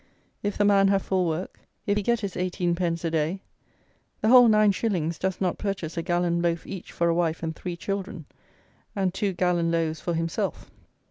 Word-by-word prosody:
If 205 Hz, -1 st, -2 dB
the 205 Hz, -, +3 dB
man 200 Hz, -1 st, +5 dB
have 195 Hz, -1 st, +2 dB
full 185 Hz, -2 st, 0 dB
work; 165 Hz, +3 st, -4 dB, 0.3 s
if 205 Hz, -, +1 dB
he 210 Hz, -, +1 dB
get 235 Hz, +2 st, +1 dB
his 200 Hz, -3 st, -4 dB
eighteen 180 Hz, -1 st, -1 dB
pence 170 Hz, -1 st, -1 dB
a 165 Hz, -, 0 dB
day, 165 Hz, +4 st, -1 dB, 0.8 s
the 215 Hz, -, +2 dB
whole 250 Hz, -1 st, +8 dB
nine 215 Hz, -1 st, +5 dB
shillings 175 Hz, -6 st, -1 dB
does 190 Hz, -1 st, -2 dB
not 185 Hz, -2 st, -1 dB
purchase 190 Hz, -6 st, -3 dB
a 165 Hz, -, -1 dB
gallon 175 Hz, 0 st, 0 dB
loaf 170 Hz, -1 st, -1 dB
each 190 Hz, -3 st, -8 dB
for 170 Hz, -, 0 dB
a 170 Hz, -, +3 dB
wife 165 Hz, -1 st, 0 dB
and 160 Hz, -1 st, -3 dB
three 175 Hz, +1 st, -5 dB
children, 195 Hz, -3 st, -4 dB, 0.7 s
and 190 Hz, -3 st, 0 dB
two 200 Hz, 0 st, 0 dB
gallon 175 Hz, -2 st, +1 dB
loaves 165 Hz, -1 st, -1 dB
for 175 Hz, -, -2 dB
himself. 165 Hz, 0 st, -3 dB
180 Hz, 200 wpm, -26 LUFS, 170-195 Hz, 0.8 s, whole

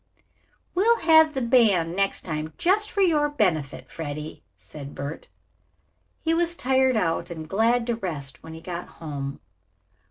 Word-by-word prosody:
"We'll 450 Hz, +6 st, +4 dB
have 315 Hz, -2 st, +6 dB
the 265 Hz, -, -1 dB
band 205 Hz, -9 st, +3 dB
next 195 Hz, 0 st, 0 dB
time 155 Hz, -1 st, -4 dB
just 415 Hz, +4 st, +2 dB
for 400 Hz, -, -1 dB
your 305 Hz, -5 st, +3 dB
benefit, 160 Hz, -, -1 dB
Freddie," 150 Hz, -1 st, -6 dB, 0.2 s
said 145 Hz, -2 st, -10 dB
Bert. 140 Hz, +3 st, -6 dB, 1.0 s
He 325 Hz, 0 st, +2 dB
was 340 Hz, +1 st, +2 dB
tired 260 Hz, -3 st, +2 dB
out 170 Hz, -3 st, 0 dB
and 160 Hz, -2 st, -7 dB
glad 230 Hz, +5 st, +2 dB
to 235 Hz, -1 st, 0 dB
rest 155 Hz, -10 st, -5 dB
when 160 Hz, -, -10 dB
they 160 Hz, -, -9 dB
got 175 Hz, 0 st, -6 dB
home. 140 Hz, -3 st, -6 dB
195 Hz, 150 wpm, -25 LUFS, -, 1.0 s, have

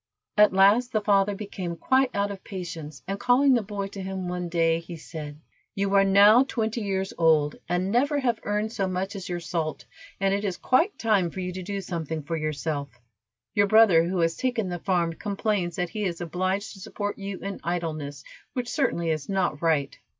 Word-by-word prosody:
At 210 Hz, -1 st, +6 dB
last 205 Hz, +6 st, +4 dB
the 215 Hz, -, +2 dB
father 205 Hz, -1 st, +3 dB
became 190 Hz, -4 st, -5 dB
quite 260 Hz, +5 st, +2 dB
out 200 Hz, 0 st, 0 dB
of 195 Hz, -1 st, -8 dB
patience, 165 Hz, -6 st, -7 dB
and 195 Hz, +1 st, -3 dB
calling 265 Hz, +2 st, +4 dB
the 240 Hz, -, +3 dB
boy 205 Hz, -1 st, -4 dB
to 195 Hz, 0 st, -7 dB
him 190 Hz, -1 st, -4 dB
one 180 Hz, -1 st, -3 dB
day, 165 Hz, -1 st, +2 dB
he 170 Hz, +1 st, -9 dB
said: 150 Hz, -2 st, -8 dB, 0.4 s
"You 200 Hz, -1 st, 0 dB
are 195 Hz, 0 st, +6 dB
now 205 Hz, +5 st, +7 dB
twenty 230 Hz, -3 st, -2 dB
years 195 Hz, -2 st, -2 dB
old, 155 Hz, -3 st, +3 dB
and 180 Hz, +2 st, 0 dB
never 285 Hz, +6 st, +2 dB
have 240 Hz, -4 st, 0 dB
earned 210 Hz, +1 st, -1 dB
so 195 Hz, -4 st, -1 dB
much 185 Hz, +2 st, -3 dB
as 190 Hz, -2 st, -6 dB
your 175 Hz, -1 st, -2 dB
salt, 165 Hz, -2 st, -3 dB, 0.3 s
and 195 Hz, 0 st, +2 dB
it 200 Hz, +1 st, -1 dB
is 190 Hz, -4 st, -2 dB
quite 330 Hz, +11 st, +2 dB
time 205 Hz, -6 st, +2 dB
for 190 Hz, -, -8 dB
you 180 Hz, 0 st, -3 dB
to 185 Hz, -, -5 dB
do 200 Hz, +2 st, -4 dB
something 160 Hz, -4 st, -4 dB
for 165 Hz, +4 st, -3 dB
yourself. 150 Hz, -4 st, -3 dB, 0.5 s
Your 205 Hz, -1 st, +3 dB
brother, 210 Hz, -6 st, +6 dB
who 180 Hz, 0 st, -1 dB
has 165 Hz, 0 st, +1 dB
taken 245 Hz, -6 st, -1 dB
the 175 Hz, -1 st, -4 dB
farm, 170 Hz, -2 st, 0 dB
complains 200 Hz, -2 st, -2 dB
that 180 Hz, -1 st, -2 dB
he 210 Hz, +4 st, -4 dB
is 175 Hz, -4 st, -2 dB
obliged 185 Hz, +4 st, -2 dB
to 195 Hz, -, -13 dB
support 205 Hz, 0 st, -4 dB
you 195 Hz, -1 st, -5 dB
in 200 Hz, 0 st, -6 dB
idleness, 155 Hz, -5 st, -3 dB, 0.3 s
which 245 Hz, -1 st, -3 dB
certainly 170 Hz, -, 0 dB
is 155 Hz, -3 st, -3 dB
not 180 Hz, -6 st, 0 dB
right." 155 Hz, -5 st, 0 dB
190 Hz, 200 wpm, -26 LUFS, 170-205 Hz, 0.5 s, now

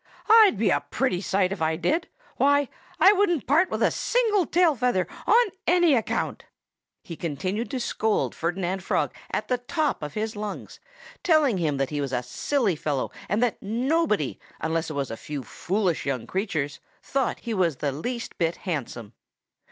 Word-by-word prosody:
"I'd 440 Hz, -, +7 dB
be 205 Hz, -2 st, +2 dB
a -, -, +3 dB
pretty 215 Hz, -9 st, -1 dB
sight, 190 Hz, -1 st, +1 dB
if 195 Hz, -4 st, -4 dB
I 160 Hz, 0 st, +1 dB
did. 305 Hz, -, 0 dB, 0.3 s
Why, 285 Hz, 0 st, +3 dB, 0.3 s
I 380 Hz, +6 st, +8 dB
wouldn't 360 Hz, -, +1 dB
part 320 Hz, +8 st, +3 dB
with -, -, -1 dB
a -, -, +4 dB
single 435 Hz, -7 st, +1 dB
tail 340 Hz, -3 st, +3 dB
feather, 240 Hz, -7 st, +1 dB, 0.2 s
on 475 Hz, +3 st, +6 dB, 0.2 s
any 350 Hz, -2 st, +5 dB
account." 230 Hz, -4 st, -1 dB, 0.6 s
He 170 Hz, -, -7 dB
continued 185 Hz, -, -3 dB
to 265 Hz, -, -3 dB
scold 220 Hz, -2 st, 0 dB
Ferdinand 180 Hz, +2 st, -2 dB
Frog -, -, 0 dB, 0.2 s
at -, -, -2 dB
the 250 Hz, -1 st, 0 dB
top 300 Hz, +5 st, -1 dB
of 150 Hz, -1 st, -6 dB
his 220 Hz, +1 st, -2 dB
lungs, 210 Hz, 0 st, -6 dB, 0.4 s
telling 300 Hz, -, +3 dB
him 150 Hz, -4 st, 0 dB
that 135 Hz, +1 st, -1 dB
he 145 Hz, -1 st, -1 dB
was 135 Hz, -2 st, -3 dB
a 125 Hz, 0 st, 0 dB
silly 205 Hz, -, 0 dB
fellow, 145 Hz, -3 st, -2 dB, 0.2 s
and 215 Hz, +4 st, +2 dB
that 245 Hz, -, 0 dB
nobody 235 Hz, -, 0 dB, 0.2 s
unless 165 Hz, +1 st, -1 dB
it -, -, -4 dB
was 140 Hz, -4 st, -2 dB
a 115 Hz, -, -5 dB
few 145 Hz, -3 st, -6 dB
foolish 185 Hz, -, -1 dB
young 130 Hz, -4 st, -2 dB
creatures 170 Hz, -8 st, -2 dB, 0.2 s
thought 270 Hz, -3 st, -1 dB
he 235 Hz, -, -3 dB
was 175 Hz, -7 st, +1 dB
the 140 Hz, +2 st, -2 dB
least 235 Hz, -, -5 dB
bit 165 Hz, -1 st, +1 dB
handsome. 120 Hz, -, -4 dB
200 Hz, 175 wpm, -25 LUFS, -, 0.6 s, I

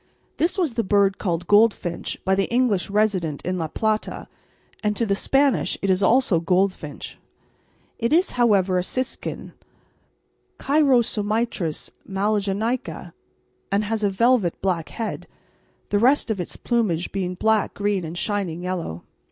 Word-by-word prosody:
This 335 Hz, +5 st, +1 dB
was 335 Hz, -9 st, 0 dB
the 230 Hz, -, 0 dB
bird 200 Hz, -1 st, +2 dB
called 175 Hz, -3 st, -2 dB
"goldfinch" 205 Hz, -4 st, +2 dB
by 190 Hz, -, +3 dB
the 195 Hz, +3 st, 0 dB
English 235 Hz, -7 st, +1 dB
resident 195 Hz, -8 st, 0 dB
in 185 Hz, 0 st, -2 dB
La 160 Hz, -, -1 dB
Plata, 215 Hz, +6 st, -2 dB, 0.5 s
and 210 Hz, -1 st, 0 dB
to 230 Hz, -, +1 dB
the 200 Hz, -, +1 dB
Spanish 270 Hz, +6 st, +1 dB
it 195 Hz, -, +2 dB
is 185 Hz, +1 st, +1 dB
also 230 Hz, -5 st, +3 dB
goldfinch; 180 Hz, -3 st, -1 dB, 0.8 s
it 235 Hz, 0 st, 0 dB
is, 345 Hz, +4 st, +3 dB
however, 200 Hz, -7 st, +3 dB
a -, -, -1 dB
siskin, 255 Hz, +7 st, -4 dB, 1.0 s
Chrysomitris 230 Hz, -, +1 dB, 0.2 s
magellanica, 205 Hz, +4 st, -1 dB, 0.6 s
and 200 Hz, +2 st, +2 dB
has 215 Hz, +1 st, -2 dB
a 205 Hz, -, +3 dB
velvet 220 Hz, -2 st, +2 dB
black 180 Hz, -4 st, -1 dB
head, 225 Hz, -2 st, -5 dB, 0.6 s
the 205 Hz, -, +2 dB
rest 255 Hz, +1 st, +3 dB
of 200 Hz, -4 st, -2 dB
its 175 Hz, -, -6 dB
plumage 205 Hz, -8 st, 0 dB
being 180 Hz, -2 st, -3 dB
black, 220 Hz, +2 st, +1 dB
green, 205 Hz, -2 st, 0 dB
and 165 Hz, +1 st, -6 dB
shining 180 Hz, -4 st, -2 dB
yellow. 175 Hz, -, -4 dB
205 Hz, 140 wpm, -23 LUFS, 185-230 Hz, 1.0 s, by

